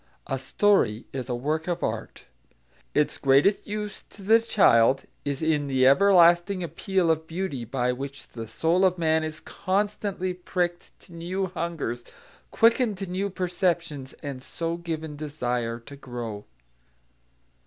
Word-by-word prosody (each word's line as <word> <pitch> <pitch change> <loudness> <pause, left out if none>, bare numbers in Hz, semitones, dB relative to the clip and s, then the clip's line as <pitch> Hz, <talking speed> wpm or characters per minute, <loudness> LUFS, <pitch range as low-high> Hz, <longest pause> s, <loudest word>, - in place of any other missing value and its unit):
A 135 - -2
story 130 - +2
is 130 -1 -4
a 120 - 0
work 155 +6 -2
of 175 -1 -2
art. - - -4 0.7
Its 150 0 +1
greatest 140 +9 +3
use 210 0 -4
to 200 - -14
the 220 +4 +6
child 135 - +4 0.2
is 140 +1 -3
in 150 -2 +1
the 130 -1 +2
everlasting 175 +4 +5
appeal 170 +2 0
of 160 0 -2
beauty 165 -8 -3
by 125 +1 0
which 135 +2 -7
the 115 -1 -7
soul 165 - +1
of 185 -1 +3
man 160 -1 +2
is 155 -1 -5
constantly 200 -1 -2
pricked 175 -1 -2
to 175 - -17
new 180 +3 -2
hungers, 165 -9 -4 0.5
quickened 230 -2 +3
to 195 - -4
new 190 +2 -2
perceptions, 175 -7 -2
and 140 -3 -5
so 165 +5 -3
given 160 -3 -5
desire 125 -6 -3
to 140 +4 -11
grow. 120 -6 -6
165 Hz, 145 wpm, -26 LUFS, 135-185 Hz, 0.7 s, the